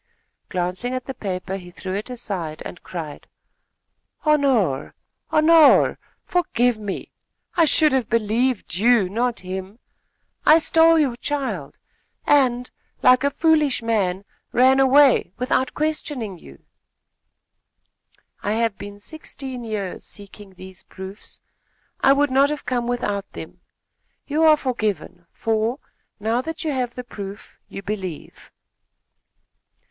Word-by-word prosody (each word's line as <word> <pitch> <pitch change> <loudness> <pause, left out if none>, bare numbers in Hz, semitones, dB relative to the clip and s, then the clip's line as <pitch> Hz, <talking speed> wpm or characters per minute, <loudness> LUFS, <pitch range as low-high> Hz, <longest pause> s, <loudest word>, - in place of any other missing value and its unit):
Glancing 185 +8 -2
at 255 - -4
the 265 - -5
paper, 190 -3 -4
he 180 -2 -11
threw 185 +1 -6
it 205 +5 -4
aside 195 -11 -5
and 175 - -8
cried: 160 -5 -7 1.0
"Honore! 265 - +2 0.3
Honore! 315 -1 +5 0.3
Forgive 245 -10 +1
me! 205 -2 -5 0.4
I 335 -2 +5
should 310 0 +4
have 260 -4 0
believed 230 -1 0
you, 215 +2 +3
not 235 +5 -1
him. 190 +3 -6 0.7
I 310 - +7
stole 330 0 +4
your 280 -6 +2
child 285 0 -3 0.5
and, 250 -4 +2 0.3
like 255 +1 +6
a 280 - +3
foolish 300 -4 +2
man, 200 -4 0 0.3
ran 260 +2 +5
away, 270 -7 +5
without 255 +1 0
questioning 290 - -2
you." 70 - -16 1.8
"I 205 - -1
have 225 -2 0
been 205 0 -9
sixteen 265 -1 -7
years 210 -5 -4
seeking 200 -1 -11
these 185 0 -10
proofs. 190 +2 -10 0.6
I 270 - +5
would 285 0 +2
not 275 +2 +4
have 300 -1 -4
come 245 -2 -1
without 205 -5 -2
them. - - -10 0.6
You 310 +2 +1
are 310 -1 +7
forgiven, 215 -9 -3
for, 225 +2 -1 0.4
now 225 +4 0
that 325 +4 -6
you 310 - -1
have 250 -3 -2
the 250 - -5
proof, 205 -3 -9
you 195 - -8
believe." 190 -6 -6
235 Hz, 125 wpm, -22 LUFS, 195-275 Hz, 1.8 s, I